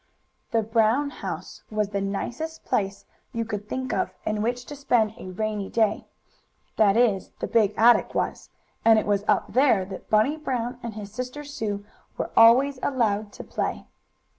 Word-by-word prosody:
The 225 -1 +1
Brown 225 +6 +2
house - - -7
was 215 -2 -1
the 200 -1 -2
nicest 240 +11 -4
place 200 -4 -1 0.3
you 230 0 -2
could 210 -1 -5
think 260 0 -3
of - - 0 0.2
in 215 -1 -1
which 245 +2 -1
to 290 - -8
spend 240 -6 +1
a - - -8
rainy 210 +1 -3
day, 220 -2 +1 0.7
that 210 -1 +4
is 215 -6 +2
the - - -2
big 215 -3 +2
attic 235 +2 +5
was, - - -2 0.3
and 225 -1 +6
it 215 - +1
was 205 -1 +1
up - - +1
there 250 -8 +4
that 190 0 -9
Bunny 220 +8 +3
Brown 250 -4 -3
and 235 -3 -6
his 205 -2 -7
sister 250 +6 -5
Sue 215 -8 -4 0.3
were - - -3
always 255 +4 +6
allowed 215 -6 0
to - - -8
play. - - -3
225 Hz, 170 wpm, -25 LUFS, 205-250 Hz, 0.7 s, and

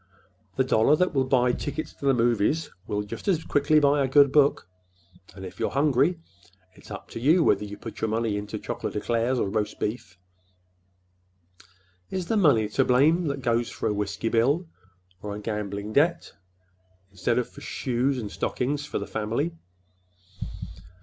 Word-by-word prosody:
The 130 - +2
dollar 130 +3 +4
that 180 +2 +1
will 135 -2 +2
buy 125 -1 +3
tickets 145 +5 -4
to - - -9
the 135 - +5
movies 120 +6 +1 0.2
will 105 0 -1
just 105 - -8
as 170 -5 +2
quickly 145 +2 +3
buy 145 -1 +3
a - - +1
good 140 +1 +5
book; 145 -7 +3 0.7
and 95 -1 -8
if 95 - -10
you're - - 0
hungry, 145 +4 +2 0.5
it's - - -17
up - - -8
to - - -7
you 160 +8 +4
whether - - +3
you 105 0 -7
put - - -9
your 110 - 0
money 110 -1 0
into 105 +1 -4
chocolate 115 +3 -5
eclairs 115 +4 0
or 110 - 0
roast 105 +1 -2
beef. 105 -4 -4 1.9
Is 185 -2 -3
the 225 - +2
money 140 - +4
to 135 +5 +2
blame 155 +7 +3
that 140 -2 -3
goes 120 0 +1
for - - -3
a - - +1
whiskey 105 +2 -2
bill 135 +10 +2 0.6
or 105 -1 -5
a - - -6
gambling 105 -1 -4
debt 170 +5 +2 0.8
instead 110 +5 -1
of 125 - 0
for - - -14
shoes 130 +2 -1
and 105 -5 -5
stockings 145 +3 -2
for - - -3
the 100 - -3
family?" 110 - -2
125 Hz, 170 wpm, -26 LUFS, 105-145 Hz, 1.9 s, the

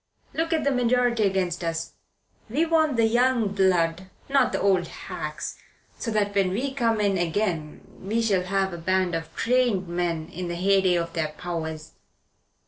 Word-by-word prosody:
Look 325 +1 -1
at 320 -1 +1
the 280 - +2
majority 245 -2 +2
against 185 -3 0
us. 165 -1 -3 0.6
We 295 +9 +1
want 315 -5 +2
the 230 - +4
young 240 -1 +2
blood 185 -2 +1 0.2
not 275 0 +3
the - - -1
old 185 -3 +2
hacks 150 -1 -6 0.4
so 230 - -3
that 210 -2 0
when 195 -2 +2
we 255 +9 -2
come 230 -4 +1
in 200 -3 +1
again 170 -3 -1 0.2
we 210 +5 -1
shall 195 -5 +1
have 190 0 0
a 170 - -6
band 185 +1 +1
of 165 -1 -3
trained 235 -6 +1
men 170 -2 -2
in 180 +1 -5
the 175 - -3
heyday 190 0 +3
of 170 -1 -2
their 160 -2 0
powers. 160 -1 -5
190 Hz, 170 wpm, -25 LUFS, 175-230 Hz, 0.6 s, the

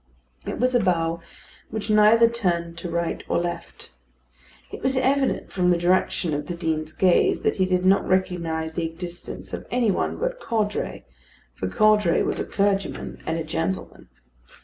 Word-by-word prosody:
It - - -3
was 255 +2 +1
a 245 - +4
bow 170 -2 0 0.5
which 215 0 -3
neither 215 +2 +6
turned 175 -7 -1
to 175 - -5
right 170 0 -2
or - - +2
left. 175 0 -5 0.8
It - - -8
was 265 0 +1
evident 270 +1 +1
from 180 -2 +1
the 175 - +4
direction 175 -1 +1
of 145 0 -3
the 175 - -4
Dean's 160 -2 -2
gaze 180 +2 +3
that - - +1
he 185 -1 +2
did 180 0 +1
not 195 +1 +4
recognise 170 -4 -1
the 165 0 -1
existence 175 +1 -8
of - - -6
any 240 -4 +2
one - - -1
but - - -2
Caudray, 215 -3 -2 0.5
for 95 - -4
Caudray 210 - +3
was - - -1
a - - -2
clergyman 200 -1 -1
and 160 +1 0
a 165 - -2
gentleman. 165 +4 -4
180 Hz, 170 wpm, -24 LUFS, 170-215 Hz, 0.8 s, neither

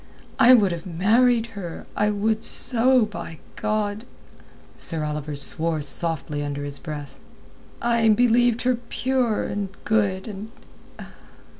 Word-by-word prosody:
I 250 +2 +7
would 200 -6 +2
have 170 +2 -6
married 225 +7 +2
her, 175 -5 -8
I 210 0 +1
would 215 +2 -1
so, 250 0 +6
by 170 -5 -9 0.2
God." 215 0 -3 0.7
Sir 160 -3 -4
Oliver 150 -1 -5
swore 155 +2 -1
softly 150 0 -1
under 145 0 -5
his 145 -1 -6
breath. 150 -3 -8 0.6
"I 235 -1 +2
believed 240 +1 +2
her 250 -1 +1
pure 255 -4 -1
and 200 -1 -4 0.2
good, 200 -3 0
and...." 210 +1 -8
205 Hz, 125 wpm, -23 LUFS, 165-230 Hz, 0.7 s, I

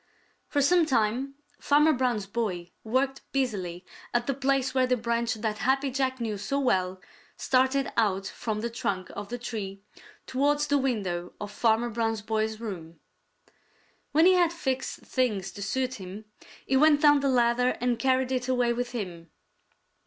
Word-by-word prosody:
For 285 -1 +1
some 340 +2 +4
time 255 +2 0 0.2
Farmer 300 +2 +4
Brown's 245 -6 0
boy 195 -5 -3
worked 260 +4 0
busily 190 -10 -2 0.3
at 240 0 +2
the 275 - 0
place 265 -1 0
where 260 -1 +3
the 250 0 +2
branch 235 0 -1
that 215 -1 -3
Happy 270 +1 +1
Jack 260 0 -1
knew 220 -4 -3
so 275 +7 -1
well 185 -8 +1 0.4
started 260 +1 +1
out 195 -4 +1
from 215 +1 -4
the 235 - -2
trunk 190 -5 -3
of 205 0 -7
the 245 - -3
tree 210 -4 -6 0.4
towards 290 +3 +1
the 285 -1 +2
window 190 -10 -2
of 205 0 -6
Farmer 230 +2 +1
Brown's 225 -1 -1
boy's 220 0 -1
room. 170 -8 -7 1.1
When 315 +3 +5
he 375 - +7
had 350 -2 +4
fixed 270 -6 -3
things 215 -8 -1
to 205 - -9
suit 255 +3 -2
him, 190 +4 -8 0.4
he 265 - +1
went 300 +1 +5
down 290 -1 +7
the 275 0 +1
ladder 250 0 +2
and 245 -1 0
carried 260 -1 +2
it 255 -1 -1
away 245 -2 +2
with 245 +1 -3
him. 175 -7 -6
240 Hz, 165 wpm, -27 LUFS, 210-265 Hz, 1.1 s, he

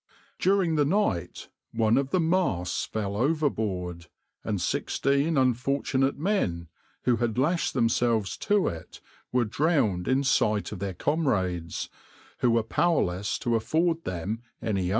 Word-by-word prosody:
During 185 -4 +2
the 145 - +4
night 145 - -1 0.2
one 110 0 +3
of 135 0 +1
the 185 - +1
masts 160 - 0
fell 100 -2 -3
overboard, 105 - -1 0.4
and - - -2
sixteen 140 +3 0
unfortunate 135 +1 +1
men, 120 - -1 0.3
who 120 -2 +2
had 115 -1 -1
lashed 165 +5 +1
themselves 115 -6 +1
to 205 -2 +1
it, 80 -1 -6 0.3
were 125 -1 +2
drowned 110 - +1
in 130 +2 +2
sight 110 -6 +1
of 105 - -6
their 95 -1 -4
comrades, 95 - -1 0.5
who 125 - +3
were 115 -1 +3
powerless 105 - 0
to 120 -1 +1
afford 165 +8 +1
them 95 +6 -4 0.2
any 100 -5 -1
aid. - - -1
120 Hz, 135 wpm, -27 LUFS, 100-150 Hz, 0.5 s, the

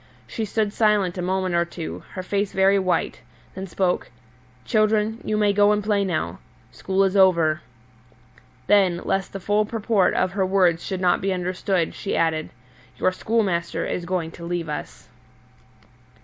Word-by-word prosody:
She 225 - -4
stood 210 0 -1
silent 205 -5 +2
a - - -1
moment 185 0 -1
or 170 0 +3
two, 170 -1 -7
her 185 - -5
face 200 +1 -1
very 195 +1 +4
white, 185 -3 -1 0.3
then 190 +1 -6
spoke: 180 0 -1 0.6
"Children, 215 +1 +1
you 215 - -1
may 205 -1 +3
go 205 +1 +4
and 210 0 +1
play 205 -1 +1
now. 175 -5 -2 0.3
School 190 +1 0
is 195 0 +1
over;" 170 -5 +4 1.0
then, 185 -2 +3
lest 195 0 -1
the 195 - -6
full 205 +3 +1
purport 215 -2 +1
of 185 - +1
her 195 0 0
words 185 -3 +2
should 190 -1 -4
not 180 -1 +2
be 195 - 0
understood, 185 -1 -1
she 200 - -3
added, 160 -1 0 0.5
"Your 185 - +2
schoolmaster 185 -4 -1
is 175 - -3
going 175 -2 -2
to 170 - -11
leave 170 -1 -3
us." 150 - -7
190 Hz, 165 wpm, -23 LUFS, 175-205 Hz, 1.0 s, very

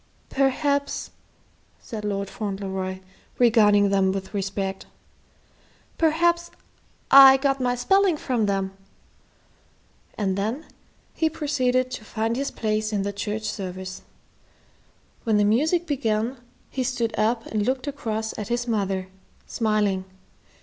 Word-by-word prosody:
"Perhaps," 280 +1 0 0.7
said 215 -2 -7
Lord 200 -1 -2
Fauntleroy, 190 -2 -4 0.4
regarding 210 -4 +5
them 190 -1 +3
with 195 +1 -5
respect, 195 -1 -3 1.1
"perhaps 340 +2 +2 0.6
I 270 -1 +10
got 270 0 0
my 245 -1 +1
spelling 380 +7 +3
from 240 -7 0
them." 195 -1 -1 1.4
And 195 -3 0
then 220 +10 -2 0.5
he 320 - +1
proceeded 255 -5 0
to 235 - -6
find 225 +2 -2
his 275 +2 -1
place 215 0 -1
in 205 -2 0
the 200 0 -3
church 210 +2 -3
service. 190 -3 -5 1.2
When 220 -2 +2
the 205 - +3
music 310 - +2
began, 245 -4 -1 0.3
he 260 - -1
stood 240 -3 -1
up 225 +2 +1
and 215 -1 -1
looked 255 +4 -1
across 225 -6 -3
at 210 - -4
his 240 +1 -1
mother, 195 -4 -1 0.4
smiling. 210 -4 0
220 Hz, 120 wpm, -24 LUFS, 200-265 Hz, 1.4 s, I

